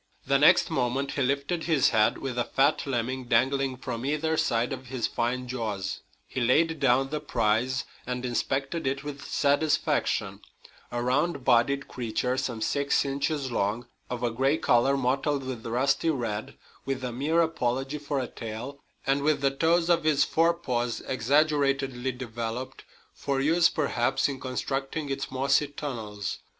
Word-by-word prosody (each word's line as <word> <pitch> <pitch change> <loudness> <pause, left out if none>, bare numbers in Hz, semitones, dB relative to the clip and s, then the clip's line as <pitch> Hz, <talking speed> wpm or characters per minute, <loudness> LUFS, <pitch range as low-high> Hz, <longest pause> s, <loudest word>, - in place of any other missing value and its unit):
The - - +3
next - - +5
moment 135 +3 0
he 140 - -2
lifted 140 +6 0
his 150 -5 +3
head 110 -2 +3
with 130 -3 -4
a - - +3
fat 140 +4 +1
lemming 130 0 -2
dangling 130 +3 +1
from 120 -2 -5
either 155 +3 0
side 120 -3 +1
of 130 -1 -8
his 125 -2 -2
fine 125 +2 -1
jaws. 105 -7 -3 0.3
He 130 - -4
laid 160 +6 +3
down 135 0 +3
the 150 - -1
prize 125 -2 0 0.2
and 125 0 -3
inspected 135 +5 -1
it 140 +2 -1
with 145 -1 -6
satisfaction 145 +2 +1 0.5
a 120 0 -2
round 140 +2 0
bodied 140 +4 +3
creature 125 +1 -2
some 120 -4 -3
six 140 +5 +1
inches 140 0 -1
long, 110 +2 -1 0.2
of 125 -1 -4
a 120 - +1
gray 135 +6 +2
color 135 +2 +3
mottled 135 +2 0
with 125 -3 -6
rusty 135 +7 +1
red, 115 -8 -3 0.3
with 135 -1 -3
a 125 - -2
mere 145 +7 0
apology 135 -3 0
for 145 -1 -2
a 130 - -1
tail, 120 +4 -7 0.3
and 135 +1 +2
with 145 -1 +1
the 135 -1 +3
toes 165 +4 +2
of 170 -2 +3
its 155 -2 +4
forepaws 160 -8 0
exaggeratedly 135 0 +1
developed, 120 +1 -5 0.3
for 140 -1 -2
use, 165 +5 +4
perhaps, 130 -5 +1
in 135 -2 -5
constructing 135 +3 -3
its 135 - -3
mossy 135 +3 +2
tunnels. 115 -8 -5
135 Hz, 155 wpm, -27 LUFS, 120-145 Hz, 0.5 s, next